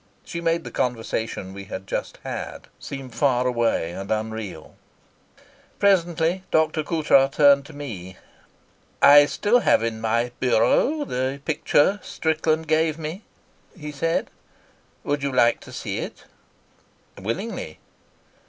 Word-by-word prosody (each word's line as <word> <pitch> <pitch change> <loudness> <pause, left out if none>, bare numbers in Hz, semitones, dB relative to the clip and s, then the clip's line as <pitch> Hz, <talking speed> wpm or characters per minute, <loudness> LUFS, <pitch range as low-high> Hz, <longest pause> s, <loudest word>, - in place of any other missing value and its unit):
She 170 - -5
made 165 0 0
the - - -8
conversation 115 -5 -3
we 100 0 -8
had 95 0 -7
just - - -4
had - - -6
seem 135 -2 -7
far 125 +1 +1
away 115 -9 0
and 95 +3 -7
unreal. 110 -2 -4 1.0
Presently 175 -2 +2
Dr. 160 0 +2
Coutras 150 -4 +3
turned 140 -1 +4
to 160 - -12
me. 95 -11 -7 0.8
"I 145 0 +8
still 220 +9 +2
have 175 - +3
in 110 -1 -3
my 115 +2 0
the 130 - +1
picture 150 0 +3
that 205 - -12
Strickland 160 0 0
gave 155 0 +2
me," 160 +5 -6 0.6
he 150 -3 -7
said. 165 +3 -1 0.7
"Would 145 0 -1
you 140 0 -1
like 120 -2 +3
to - - -13
see - - -4
it?" - - -7 1.0
"Willingly." 115 - -4
140 Hz, 125 wpm, -23 LUFS, 115-160 Hz, 1.0 s, I